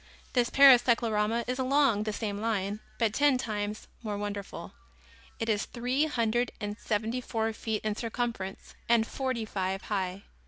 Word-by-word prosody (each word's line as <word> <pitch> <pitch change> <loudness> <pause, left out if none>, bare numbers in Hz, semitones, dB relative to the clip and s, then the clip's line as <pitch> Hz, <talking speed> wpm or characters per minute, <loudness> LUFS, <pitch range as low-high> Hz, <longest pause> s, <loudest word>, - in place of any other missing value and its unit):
This 245 -2 +2
Paris 270 -3 +8
cyclorama 230 -2 +1
is 250 +1 -3
along 260 -5 +3
the 215 - -1
same 205 -1 -3
line, 210 -2 -1 0.2
but 225 -3 +1
ten 285 0 +4
times 210 -3 -3 0.2
more 210 -3 -3
wonderful. 205 -1 -5 0.7
It 225 - -2
is 215 -2 +1
three 250 +5 0
hundred 240 -4 0
and 205 0 -4
seventy 225 +3 -1
four 225 -2 -1
feet 220 -1 -3
in 215 -1 0
circumference 230 -4 -4 0.2
and 235 -1 +5
forty 255 -3 -2
five 190 -2 -2
high. 190 -1 -2
225 Hz, 155 wpm, -29 LUFS, 205-245 Hz, 0.7 s, Paris